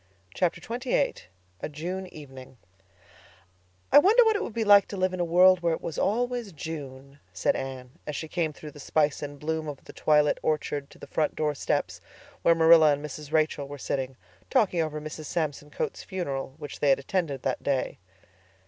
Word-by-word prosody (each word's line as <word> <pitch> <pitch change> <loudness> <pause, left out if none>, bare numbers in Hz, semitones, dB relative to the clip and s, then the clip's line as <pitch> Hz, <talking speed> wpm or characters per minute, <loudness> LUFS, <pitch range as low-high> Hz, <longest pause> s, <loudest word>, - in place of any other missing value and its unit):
Chapter 180 -2 0
XXVIII 250 +3 -1 0.5
A - - -4
June 180 +6 -5
Evening 135 -6 -12 1.3
"I - - +10
wonder 430 +9 +6
what 440 -1 +4
it 410 - 0
would - - -4
be 230 - +1
like 205 -1 +7
to 200 - -6
live 185 0 +1
in 185 - -4
a - - +2
world 180 +2 +6
where 170 -1 +1
it - - -11
was 160 - -4
always 240 0 0
June," 140 -3 -8
said - - +1
Anne, 130 -2 -6 0.2
as 150 - -3
she 160 - -4
came 165 -1 -1
through 150 0 -10
the 145 - -14
spice 150 0 +1
and 145 -1 -6
bloom 160 +1 -2
of 145 -2 -7
the - - -11
twilit 150 -1 +3
orchard 145 -2 -1
to - - -16
the - - -10
front 155 - -1
door 150 -1 0
steps, 135 - -2 0.4
where 170 - +5
Marilla 160 -1 +7
and 145 +1 -4
Mrs. 150 0 -8
Rachel 155 -3 +1
were 145 +1 -8
sitting, 130 -1 -3 0.3
talking 185 -5 +2
over 155 -1 -2
Mrs. 155 +1 -7
Samson 150 -2 -3
Coates' - - -4
funeral, 140 -8 -4
which 145 -3 -8
they 145 - +2
had 135 - +5
attended 140 -2 -2
that - - -1
day. 140 -2 -1
155 Hz, 195 wpm, -27 LUFS, 145-180 Hz, 1.3 s, I